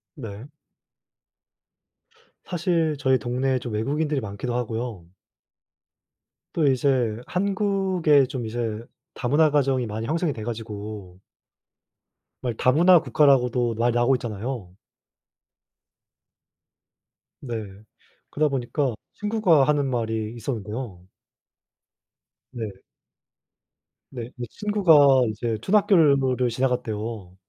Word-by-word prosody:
네. 110 -1 -8 2.0
사실 170 -3 0
저희 130 -1 +3
동네에 130 +3 -1
좀 120 -3 -6
외국인들이 145 +6 -1
많기도 110 +4 -4
하고요. 115 -5 -4 1.5
또 155 -4 +2
이제 130 -4 +1
한국에 190 -6 +2
좀 125 -2 -5
이제 115 0 -4 0.3
다문화 145 +5 +3
가정이 135 -4 +1
많이 110 +1 -4
형성이 160 -1 0
돼 110 - -7
가지고 105 -4 -7 1.2
말 125 -2 -1
다문화 165 +9 +5
국가라고도 125 -6 +2
말 120 +2 +1
나오고 120 +2 +3
있잖아요. 115 -4 -5 2.7
네. 110 -6 -6 0.5
그러다 150 0 +1
보니까 135 -1 -1 0.2
친구가 205 -8 +2
하는 145 -1 +2
말이 110 -2 -2
있었는데요. 110 -4 -5 1.5
네. 115 -4 -5 1.4
네. 120 -2 -7
이 120 -1 -5
친구가 155 - +4
이제 110 +1 -3
초등학교 205 - +3
건물을 135 -6 +3
지나갔대요. 115 -6 -3
125 Hz, 220 characters per minute, -24 LUFS, 110-145 Hz, 2.7 s, 다문화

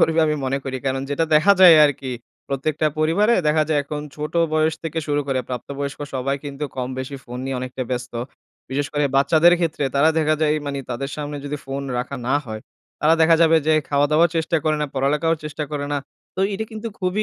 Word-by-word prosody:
করবে 160 0 +3
আমি 150 - +1
মনে 135 +1 0
করি। 130 -1 -3
কারণ 135 0 -1
যেটা 160 +3 +1
দেখা 155 +7 +6
যায় 175 -3 +10
আরকি 135 -3 -1 0.4
প্রত্যেকটা 150 +3 -1
পরিবারে 185 +9 +3
দেখা 155 +1 +3
যায় 155 -2 +2
এখন 150 +1 -5 0.2
ছোট 150 +1 -5 0.2
বয়স 155 0 +2
থেকে 165 0 -3
শুরু 145 -1 +1
করে 135 -2 0
প্রাপ্ত 125 -2 -5
বয়স্ক 140 0 -4
সবাই 135 +2 -1
কিন্তু 140 +1 -5
কম 125 -1 -2
বেশি 130 +2 -5
ফোন 125 +1 -7
নিয়ে 135 -1 -2
অনেকটা 130 0 -4
ব্যস্ত। 125 -1 -3 0.6
বিশেষ 140 +1 -1
করে 145 0 +1
বাচ্চাদের 160 +5 +5
ক্ষেত্রে। 155 -3 -1
তারা 145 +3 +5
দেখা 155 0 +2
যায় 155 -1 +3
এই 155 - -2
মানে 140 -1 -3
তাদের 135 +4 -3
সামনে 145 -1 -5
যদি 145 +1 -3
ফোন 135 +1 -4 0.2
রাখা 135 +3 -4
না 135 - +2
হয়, 110 -1 -6 0.4
তারা 155 +2 +4
দেখা 160 0 +6
যাবে 165 0 +5
যে 155 - +4 0.2
খাওয়া-দাওয়া 150 +3 +3
চেষ্টা 165 +1 +1
করে 155 -1 +2
না, 150 - 0
পড়ালেখারও 150 +4 +1
চেষ্টা 150 0 -4
করে 145 -1 -2
না। 145 - +1 0.4
তো - - -1
এইটা 200 +3 -3
কিন্তু 220 +1 -5
খুবই 185 +3 0
150 Hz, 215 wpm, -21 LUFS, 135-160 Hz, 0.6 s, যায়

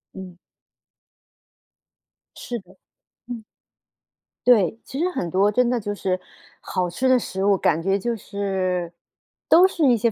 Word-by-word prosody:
嗯。 185 -2 -9 2.0
是 240 -1 -5
的， 190 -1 -20 0.5
嗯。 235 -2 -7 1.0
对， 220 -5 +5
其 270 - -7
实 350 +3 +1
很 180 - -3
多 195 +3 +3
真 250 +3 +2
的 245 -1 +1
就 205 -1 -4
是 185 -2 -1 0.4
好 180 -2 -2
吃 250 +10 -1
的 255 0 +5
食 190 -5 -3
物， 200 -1 +5
感 165 -2 +1
觉 195 +3 +1
就 235 +4 -2
是 190 -4 -2 0.6
都 350 +3 +7
是 335 -5 0
一 245 - +5
些 230 +1 +1
200 Hz, 155 characters per minute, -23 LUFS, 185-245 Hz, 2.0 s, 都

